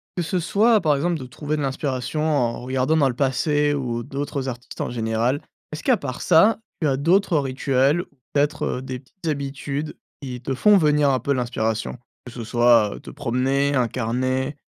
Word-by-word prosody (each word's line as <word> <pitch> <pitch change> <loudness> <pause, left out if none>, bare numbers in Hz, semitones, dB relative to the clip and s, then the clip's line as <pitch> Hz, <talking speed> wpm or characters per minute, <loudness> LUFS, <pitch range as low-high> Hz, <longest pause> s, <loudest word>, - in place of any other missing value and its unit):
que 175 - -1
ce 180 +2 -1
soit, 215 +6 +3
par 150 -3 +3
exemple, 165 +2 0
de 130 - -7
trouver 150 +4 -4
de - - -2
l'inspiration 135 +1 -2
en 125 -7 0
regardant 130 +4 0
dans 140 -3 +4
le 120 - -4
passé, 145 +2 +1
ou, 120 -4 -2
d'autres 140 0 -4
artistes 120 -1 -7
en - - -2
général, 115 +3 0 0.3
est-ce 155 - -6
qu'à 255 -4 +3
part 140 -3 -6
ça, 205 +6 +5 0.2
tu 155 - +2
as 135 - +2
d'autres 175 +3 +3
rituels? 135 +3 +1
Ou - - -10 0.3
peut-être, 145 +1 +1
heu, 125 - -2
des 130 -1 -6
petites 165 +6 -11
habitudes, 140 0 -3 0.2
qui 125 -2 -6
te 135 +2 -3
font 205 +11 +5
venir 150 -3 +3
un 130 -1 +2
peu 140 - 0
l'inspiration? 115 -2 -2 0.3
Que 125 - -9
ce 120 -1 -7
soit, 120 -3 +3
te - - -10
promener, 135 +4 0
un 125 -2 +2
carnet 130 +4 -1
135 Hz, 190 wpm, -23 LUFS, 125-150 Hz, 0.3 s, ça